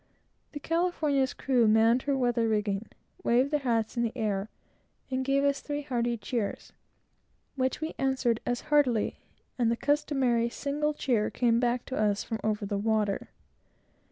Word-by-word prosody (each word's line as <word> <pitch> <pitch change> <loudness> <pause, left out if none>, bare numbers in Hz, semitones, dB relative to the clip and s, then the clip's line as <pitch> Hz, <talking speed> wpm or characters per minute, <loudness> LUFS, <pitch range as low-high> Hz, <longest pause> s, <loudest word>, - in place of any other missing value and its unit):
The 290 - -5
California's 310 -5 0
crew 250 -4 +2
manned 225 +3 +4
her 275 - +2
weather 240 -2 +1
rigging, 210 -1 -1 0.3
waved 255 +4 +2
their 300 - +2
hats 230 -4 0
in 235 - 0
the 235 +1 -2
air, 210 -2 -1 0.6
and 260 0 0
gave 275 +1 +1
up 280 0 +4
three 290 +1 -4
hearty 240 -3 -1
cheers, 215 0 -4 0.8
which 260 +2 -1
we 315 +1 -3
answered 265 -4 +1
as 245 0 -2
heartily, 255 -7 +2 0.4
and 235 -2 +3
the 230 - 0
customary 270 -5 +1
single 295 +4 -2
cheer 235 -7 +1
came 235 -2 +2
back 245 0 0
to 260 - -5
us 210 -1 +1
from 225 - -4
over 210 -1 -1
the 200 0 -2
water. 215 -2 0
240 Hz, 155 wpm, -28 LUFS, 225-275 Hz, 0.8 s, manned